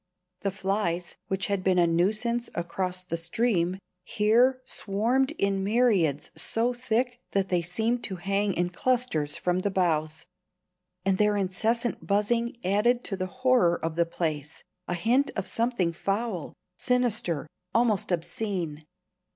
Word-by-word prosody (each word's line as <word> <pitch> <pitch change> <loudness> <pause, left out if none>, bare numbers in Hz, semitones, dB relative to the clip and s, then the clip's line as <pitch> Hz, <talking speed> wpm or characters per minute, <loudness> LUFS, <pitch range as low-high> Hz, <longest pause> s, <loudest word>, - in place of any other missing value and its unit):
The 200 - -1
flies, 190 -3 -2
which 190 0 -1
had 200 -2 -1
been 185 -1 +3
a 175 - +5
nuisance 215 +8 +1
across 180 +1 -2
the 175 -2 -3
stream, 180 +1 0 0.3
here 235 +7 +3
swarmed 240 +5 0
in 195 - 0
myriads 200 - +2
so 235 +2 0
thick 245 0 -1
that 195 -1 +1
they 180 -2 +2
seemed 220 +8 -1
to 190 - -4
hang 195 +2 0
in 175 0 0
clusters 210 -10 0
from 180 0 0
the 200 - 0
boughs; 155 -4 0 0.8
and 195 -1 +2
their 210 -1 +3
incessant 220 +5 -1
buzzing 230 +4 +1
added 225 +6 +2
to 195 - -3
the 185 -1 -3
horror 255 -6 +3
of 165 -1 -3
the 170 0 +2
place 155 -3 -3 0.2
a 175 - -1
hint 245 +10 +2
of 195 - -2
something 230 -8 0
foul, 195 -1 -2 0.3
sinister, 225 - +1 0.3
almost 225 -6 +2
obscene. 175 -2 -2
195 Hz, 140 wpm, -27 LUFS, 175-235 Hz, 0.8 s, a